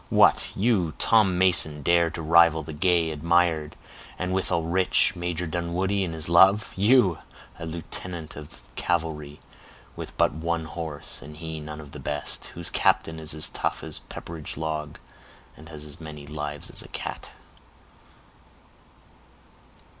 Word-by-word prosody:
"What, - - +4
you, 95 -7 +1
Tom 105 -5 +4
Mason, 80 -5 +4
dare 85 +2 +4
to 80 0 -6
rival 80 0 +5
the 80 +1 -8
gay, 85 +1 +2
admired, 80 0 +1 0.4
and 90 0 -2
withal 90 -3 0
rich, 90 +2 +3
Major 90 0 -2
Dunwoodie 90 +4 -1
in 85 -3 -3
his 80 -2 -1
love! 95 +5 +5
You, 100 -3 +4 0.4
a 80 - -5
lieutenant 85 0 -6
of 75 0 -11
cavalry, 80 -4 -2 0.6
with - - -8
but - - +3
one 80 +1 -2
horse, 80 -2 -5
and 75 +1 -11
he 80 -1 -6
none 75 0 -7
of 75 -2 -11
the - - -9
best! 75 0 -2
whose - - -2
captain 80 0 +2
is 80 -1 -2
as 80 - 0
tough - - -3
as - - -5
a - - -22
pepperidge 80 -2 -7
log, 75 -2 -4 0.6
and 80 +1 -14
has 75 -2 -8
as 75 +1 -9
many 75 -2 -9
lives 75 -1 -6
as - - -1
a - - -9
cat!" - - -6
80 Hz, 150 wpm, -26 LUFS, 75-90 Hz, 0.6 s, rival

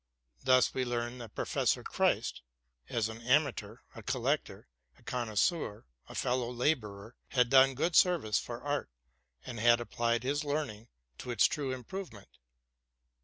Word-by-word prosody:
Thus 130 0 +4
we 130 - 0
learned 120 0 -3
that 115 - -10
Professor - - 0
Christ, - - 0 0.5
as 115 -2 0
an 110 +1 -8
amateur, 135 +3 +1 0.2
a - - -9
collector, - - -2 0.3
a - - -23
connoisseur, 120 - -1 0.2
a - - -9
fellow 125 -1 0
laborer, 120 -5 -1
had 125 -3 +2
done 135 0 +6
good 165 +5 0
service 170 - +4
for 120 -1 -7
art, 145 - -2 0.6
and 120 -3 -6
had 120 +1 +5
applied 120 0 -1
his 145 +3 0
learning 145 -7 -3 0.3
to - - -7
its 120 -3 +4
true 140 -3 0
improvement. 130 - -8
125 Hz, 140 wpm, -31 LUFS, 115-140 Hz, 0.6 s, done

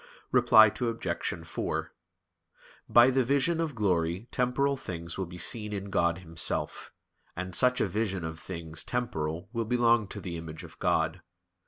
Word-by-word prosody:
Reply 110 -1 +7
Obj. 95 -8 -2
4: - - -3 1.0
By 120 +2 +7
the 130 0 +2
vision 140 +6 +2
of 155 -5 -2
glory 90 -1 0
temporal 135 +3 +1
things 85 -9 -6
will 95 -2 -3
be 90 +1 -10
seen 105 +4 -3
in 100 0 -5
God 85 -2 +2
Himself; 85 -3 -2 0.4
and 90 +1 -5
such 125 0 +4
a - - +3
vision 95 -2 -2
of 80 0 -5
things 80 -3 -5
temporal 85 -9 -3
will 115 -1 -1
belong 120 -2 +3
to - - -7
the 85 -3 -5
image 80 -1 -8
of - - -13
God. 80 +2 +1
95 Hz, 155 wpm, -29 LUFS, 85-120 Hz, 1.0 s, Reply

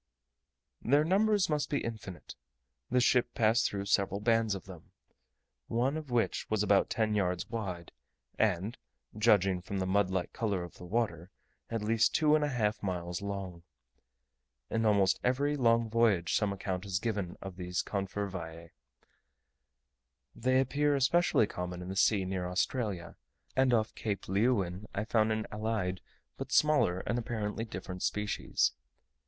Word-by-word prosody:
Their 145 +5 +3
numbers 200 +3 +3
must 150 -2 -1
be 145 - +1
infinite: 110 -6 -7 0.6
the 125 - +3
ship 125 0 +2
passed 115 +1 +3
through 100 -1 -4
several 100 0 +1
bands 115 -1 +2
of 95 - -8
them, 90 -4 -13 0.7
one 125 +5 0
of 155 -3 -6
which 120 -2 0
was 110 -1 +1
about 100 -1 +3
ten 110 -1 0
yards 90 -3 0
wide, 95 -7 -4 0.5
and, 105 +1 0 0.4
judging 100 -4 +3
from 100 +3 -5
the 95 - -1
mud 95 0 +2
like 95 -1 -2
colour 100 -6 -1
of 85 - -11
the 90 - -9
water, 95 -4 -1 0.4
at 115 -2 -2
least 115 +1 +2
two 150 -1 +4
and 155 -1 +4
a - - +2
half 110 -5 0
miles 90 -2 -3
long. 100 -4 -5 1.1
In 115 0 +1
almost 100 -3 +3
every 140 +4 +1
long 115 -3 +3
voyage 110 -6 +2
some 105 -2 +2
account 95 -1 -3
is 95 -3 -1
given 100 -5 -3
of 95 -2 -8
these 90 -1 -2
confervae. 95 -5 -4 1.6
They 130 +2 +2
appear 145 +2 +2
especially 140 -1 +3
common 90 -2 -5
in 90 - -7
the 95 - -4
sea 95 0 +3
near 95 -1 -2
Australia; 95 -1 -2 0.4
and 130 -1 +3
off 110 -2 +1
Cape 105 -3 -4
Leeuwin 100 -2 0
I 105 - -1
found 110 -1 +2
an 110 0 -1
allied 105 -4 -2 0.4
but - - -6
smaller 145 -12 +3
and 120 - -1
apparently 110 -2 -3
different 90 -3 -7
species. 105 -1 0
105 Hz, 150 wpm, -31 LUFS, 95-115 Hz, 1.6 s, two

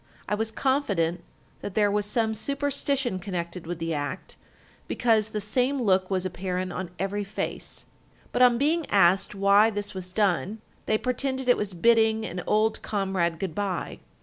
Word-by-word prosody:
I - - -1
was 220 +1 0
confident 200 - 0 0.4
that 200 - -6
there 205 -1 +3
was 205 0 0
some 220 0 +1
superstition 275 -2 -1
connected 175 -2 -5
with 175 0 -3
the 165 0 -2
act, 145 +4 -4 0.5
because 220 -3 +2
the 215 - -3
same 250 +6 0
look 190 -5 +2
was 190 -1 -1
apparent 185 0 -3
on 185 -1 -4
every 200 +2 -2
face; 200 +1 -5 0.5
but - - 0
on 245 -1 +6
being 305 +4 +1
asked 195 +1 +3
why 200 +2 +5
this 205 -1 -4
was 185 -1 -6
done, 200 +1 0 0.3
they 215 - +3
pretended 260 +2 -2
it 245 - +6
was 200 -3 -3
bidding 220 +2 +3
an 180 -3 -4
old 215 +1 +2
comrade 190 -5 -1
good 185 -1 -4
bye. 195 -1 -3
205 Hz, 165 wpm, -26 LUFS, 185-225 Hz, 0.5 s, on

